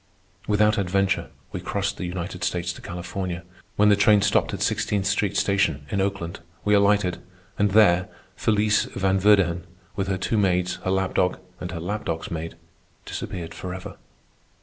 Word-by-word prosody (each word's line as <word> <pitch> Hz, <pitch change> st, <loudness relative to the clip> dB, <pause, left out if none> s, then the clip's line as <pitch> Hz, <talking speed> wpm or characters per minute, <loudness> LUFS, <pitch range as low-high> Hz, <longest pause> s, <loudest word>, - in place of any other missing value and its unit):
Without 105 Hz, 0 st, +3 dB
adventure 100 Hz, +1 st, +1 dB, 0.2 s
we -, -, -4 dB
crossed 100 Hz, 0 st, -2 dB
the 90 Hz, -, -3 dB
United 90 Hz, 0 st, -5 dB
States 90 Hz, 0 st, -1 dB
to -, -, -12 dB
California. 90 Hz, 0 st, -5 dB, 0.3 s
When 105 Hz, +1 st, +5 dB
the 105 Hz, -, +6 dB
train 100 Hz, 0 st, +5 dB
stopped -, -, +2 dB
at -, -, -2 dB
Sixteenth 100 Hz, -2 st, 0 dB
Street 100 Hz, 0 st, +1 dB
Station, 95 Hz, -8 st, +1 dB
in 100 Hz, -, +1 dB
Oakland, 95 Hz, -4 st, -2 dB, 0.3 s
we 105 Hz, -, +3 dB
alighted, 100 Hz, -3 st, +3 dB, 0.4 s
and 105 Hz, 0 st, +4 dB
there 95 Hz, -3 st, +5 dB, 0.3 s
Felice 105 Hz, 0 st, +2 dB
Van 95 Hz, 0 st, 0 dB
Verdighan, 95 Hz, -4 st, +4 dB, 0.3 s
with 95 Hz, -1 st, -1 dB
her 95 Hz, -1 st, 0 dB
two 105 Hz, +4 st, 0 dB
maids, 90 Hz, -2 st, +1 dB
her -, -, -1 dB
lap 95 Hz, 0 st, 0 dB
dog, 90 Hz, -, +2 dB, 0.2 s
and 90 Hz, -, -5 dB
her 85 Hz, -1 st, -5 dB
lap 105 Hz, +6 st, -4 dB
dog's 80 Hz, 0 st, -3 dB
maid, 85 Hz, 0 st, -4 dB, 0.5 s
disappeared 85 Hz, -3 st, -5 dB
forever. 95 Hz, +1 st, -7 dB
95 Hz, 165 wpm, -24 LUFS, 90-100 Hz, 0.5 s, the